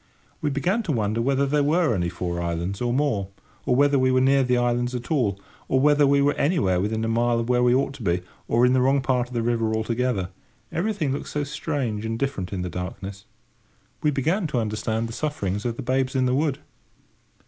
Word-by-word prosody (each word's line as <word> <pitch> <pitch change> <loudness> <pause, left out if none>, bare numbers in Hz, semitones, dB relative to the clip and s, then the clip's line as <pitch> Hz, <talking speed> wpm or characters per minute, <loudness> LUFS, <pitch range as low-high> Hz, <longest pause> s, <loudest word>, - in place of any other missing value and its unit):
We 150 - 0
began 175 +11 0
to 190 - -3
wonder 110 -3 0
whether 135 +3 +2
there 145 +2 +1
were 155 -1 +2
only 85 -4 0
four 85 -1 -3
islands 85 +4 -3
or 120 -1 0
more, 125 -7 0 0.4
or 125 - +3
whether 140 +1 +4
we 130 0 +3
were 130 - +3
near 135 +1 +4
the 125 -1 +2
islands 120 +1 0
at 120 +4 -6
all, 110 -10 +1 0.3
or 130 - +2
whether 145 +1 +4
we 140 0 +4
were 145 +1 +3
anywhere 135 - +1
within 110 +3 -1
a - - -1
mile 120 +1 +2
of 115 +1 -3
where 125 0 +3
we 125 0 +4
ought 135 +1 0
to 140 - -11
be, 90 -3 0 0.3
or 120 +2 +3
in 125 - +4
the 130 - +3
wrong 135 +2 +3
part 125 -2 0
of 125 - -10
the 115 - 0
river 115 -2 0
altogether; 110 -3 -1 0.4
everything 180 -5 -1
looked 140 - -4
so 150 - -2
strange 140 -7 -3
and 115 0 -2
different 130 -9 -3
in 95 -2 -3
the - - -3
darkness. 95 +3 -6 0.8
We 150 - +2
began 160 +7 0
to 150 - -2
understand 110 +1 -2
the 115 - -8
sufferings 105 -9 -3
of 120 -1 -1
the - - -6
Babes 130 +1 0
in 130 -1 +2
the 125 - +1
Wood. 140 0 +1
125 Hz, 225 wpm, -24 LUFS, 110-140 Hz, 0.8 s, whether